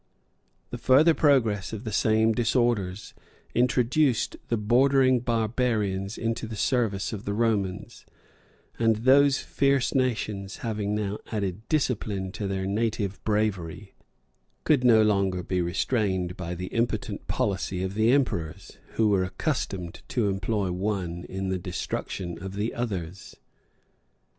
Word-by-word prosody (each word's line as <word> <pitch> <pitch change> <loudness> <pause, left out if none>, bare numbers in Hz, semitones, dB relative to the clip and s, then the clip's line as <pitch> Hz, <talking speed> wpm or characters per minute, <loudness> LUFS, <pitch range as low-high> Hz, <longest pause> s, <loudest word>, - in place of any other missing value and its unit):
The 120 - -5
further 145 +7 +5
progress 115 - +2
of 110 0 -5
the 110 - -4
same 110 +2 +3
disorders 115 -5 0 0.4
introduced 125 +1 +2
the 115 - 0
bordering 130 +4 +4
barbarians 110 -4 -1
into 115 0 -2
the 110 - -6
service 110 -3 0
of 100 - -6
the 100 - -3
Romans; 105 -4 -1 0.8
and 115 -1 +3
those 135 +5 +5
fierce 140 -2 +1
nations, 110 -7 -1
having 105 -2 -1
now 105 -1 -2
added 100 0 -3
discipline 105 -10 -1
to 100 +1 -4
their 95 -1 -2
native 105 -1 -2
bravery, 100 -3 -2 0.7
could 145 -5 +3
no 115 -3 +6
longer 100 -4 +1
be 90 +1 -1
restrained 95 0 -1
by 90 -1 -5
the 90 +1 -6
impotent 115 +1 -2
policy 95 -2 -1
of 95 0 -3
the 110 +3 +3
emperors, 85 - -1
who 110 - +2
were 95 -2 +3
accustomed 95 - -3
to 115 -5 0
employ 95 0 -1
one 90 -2 -3
in 95 0 -4
the 95 -1 -1
destruction 90 0 -4
of 95 0 -6
the 105 +3 -2
others. 95 -6 -5
105 Hz, 130 wpm, -26 LUFS, 95-120 Hz, 0.8 s, no